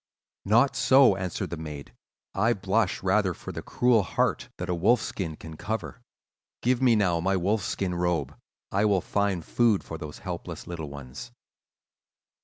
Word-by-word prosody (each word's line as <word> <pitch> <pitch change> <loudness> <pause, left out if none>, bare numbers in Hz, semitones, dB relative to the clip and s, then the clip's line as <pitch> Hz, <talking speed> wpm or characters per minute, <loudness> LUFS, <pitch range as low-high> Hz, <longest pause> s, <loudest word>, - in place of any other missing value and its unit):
"'Not 120 +6 +4
so,' 125 -2 +5
answered 95 -2 -4
the 85 - -3
maid; 75 -3 -8 0.4
'I 110 +5 +2
blush 95 -1 0
rather 95 -1 +2
for - - -8
the - - -6
cruel 120 -3 +3
heart 85 - -1
that 90 - -4
a 90 - 0
wolf 105 +8 +3
skin 85 -7 -4
can 80 +1 -10
cover. 110 +7 -5 0.6
Give 125 +1 +2
me 125 -3 +5
now 90 -5 +2
my 95 +3 +1
wolf 100 +4 +1
skin 95 -1 -2
robe: 85 -5 -1 0.4
I 100 +2 +1
will 100 -3 +3
find 100 -4 -1
food 115 -5 +2
for 80 - -7
those 75 -2 -7
helpless - - -6
little 80 -4 -6
ones. 70 - -9
95 Hz, 165 wpm, -27 LUFS, 85-110 Hz, 0.6 s, so